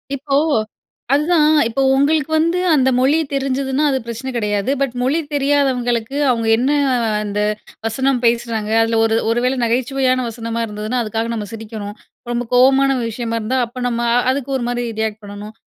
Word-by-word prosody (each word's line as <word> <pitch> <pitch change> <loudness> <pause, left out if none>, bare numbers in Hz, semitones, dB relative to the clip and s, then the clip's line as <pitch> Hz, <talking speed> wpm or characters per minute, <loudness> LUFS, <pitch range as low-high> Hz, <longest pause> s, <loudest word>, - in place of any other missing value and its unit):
இப்போ, 275 0 -2 0.8
அதுதான் 300 +2 +3 0.2
இப்போ 235 +4 -2
உங்களுக்கு 300 +2 +1
வந்து 335 +3 +1
அந்த 265 -3 +3
மொழி 275 +4 +3 0.2
தெரிஞ்சுதுன்னா, 270 +1 -1
அது 270 - +1
பிரச்சன 235 +3 -5
கிடையாது. 210 +1 -1
பட், 265 -3 0
மொழி 270 +6 +1
தெரியாதவங்களுக்கு 270 -3 0
அவுங்க 230 -2 -1
என்ன 255 +4 0 0.5
அந்த 205 0 -3 0.5
வசனம் 260 +3 0
பேசுறாங்க? 230 -2 0
அதில 225 0 0
ஒரு 225 - +1
ஒரு 230 +1 +1
வேள 255 +1 +1
நகைச்சுவையான 255 +2 +1
வசனமா 230 0 -4
இருந்ததுனா, 215 +3 -3
அதுக்காக 225 +1 -3
நம்ம 210 -2 -4
சிரிக்கணும். 215 -2 -7 0.4
ரொம்ப 240 0 -2
கோவமான 265 +2 +5 0.2
விஷயமா 230 0 -3
இருந்தா, 240 +4 -1
அப்ப 245 +2 -7
நம்ம 235 -1 -2 0.3
அதுக்கு 275 0 -3
ஒருமாரி 245 -1 -2
ரியாக்ட் 220 -1 -2
பண்ணணும். 205 +1 -9
245 Hz, 150 wpm, -18 LUFS, 225-270 Hz, 0.8 s, கோவமான